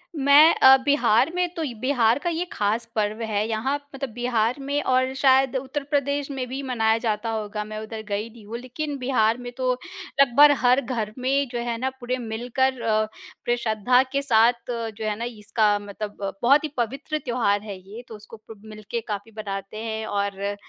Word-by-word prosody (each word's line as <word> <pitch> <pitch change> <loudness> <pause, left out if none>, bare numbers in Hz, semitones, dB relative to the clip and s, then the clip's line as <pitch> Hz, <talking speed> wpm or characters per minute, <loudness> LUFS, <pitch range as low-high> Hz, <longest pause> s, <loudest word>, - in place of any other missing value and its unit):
मैं 290 +3 +7
अ, 265 0 +8
बिहार 270 0 +3
में 360 0 +1
तो 325 - -3
इ 255 -5 -3
बिहार 250 -2 +2
का 345 - -2
ये 340 +2 -2
ख़ास 215 +3 0
पर्व 215 +1 -1
है, 215 -1 -1
यहाँ 225 +6 0 0.2
मतलब 270 -1 -4
बिहार 240 -1 0
में 285 +1 -1
और 260 0 +1
शायद 270 -1 +3
उत्तर 270 +2 -4
प्रदेश 285 0 -1
में 260 -2 -3
भी 265 +3 -5
मनाया 225 -4 +1
जाता 220 +1 -1
होगा। 210 -1 -3
मैं 215 0 -7
उधर 220 0 -7
गई 210 +3 -2
नहीं 220 -2 -15
हूँ, 230 +3 -6
लेकिन 280 +4 -5
बिहार 245 -3 +1
में 245 0 -7
तो 255 -1 +1 0.5
लगभग 285 +3 +7
हर 250 +3 +5
घर 225 -4 -3
में 270 +2 +1
जो 240 - -3
है 235 -1 -2
ना 260 +2 -1
पूरे 250 +1 -2
मिलकर 245 +2 -1
अ, 215 -1 +1
पूरे 240 +2 -5
श्रद्धा 235 +3 +2
के 280 0 0
साथ 235 -3 +4 0.2
जो 225 -2 -4
है 210 -1 -1
ना 235 - -2
इसका 210 -2 0
मतलब 205 +1 -7 0.2
बहुत 280 +5 +5
ही 310 - -2
पवित्र 275 +6 -2
त्योहार 225 -5 +1
है 200 -3 -7
ये, 205 +6 -10
तो 220 - -9
उसको 215 +2 -13
प 220 -1 -14 0.2
मिलके 235 +3 -3
काफ़ी 210 +1 -5
बनाते 195 0 -6
हैं 220 -1 -3
और 200 -1 -2
अ, 200 +1 -2
235 Hz, 195 wpm, -24 LUFS, 215-265 Hz, 0.5 s, अ